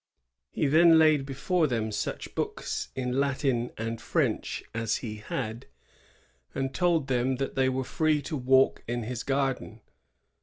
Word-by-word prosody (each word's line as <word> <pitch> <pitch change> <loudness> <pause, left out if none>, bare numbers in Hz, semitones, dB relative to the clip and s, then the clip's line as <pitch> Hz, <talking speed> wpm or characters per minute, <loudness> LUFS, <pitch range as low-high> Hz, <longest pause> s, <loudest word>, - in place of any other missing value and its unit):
"^ - - -63 0.5
He - - -1
then 165 +3 +6
laid 155 -3 +4
before 155 +5 +1
them 115 -4 -1
such - - -4
books - - -3
in 130 0 -1
Latin 135 -3 0
and 115 0 -4
French - - -1
as 115 -1 0
he 110 -1 -5
had, 110 +2 -5 0.9
and 135 0 -2
told 165 0 +2
them 130 0 +1
that 135 +1 -3
they 130 -1 +2
were 130 0 -1
free 155 +3 +1
to. 160 - -4
walk 130 0 +3
in 120 0 -2
his 120 +1 -4
garden. 135 -4 -2
130 Hz, 155 wpm, -28 LUFS, 120-140 Hz, 0.9 s, then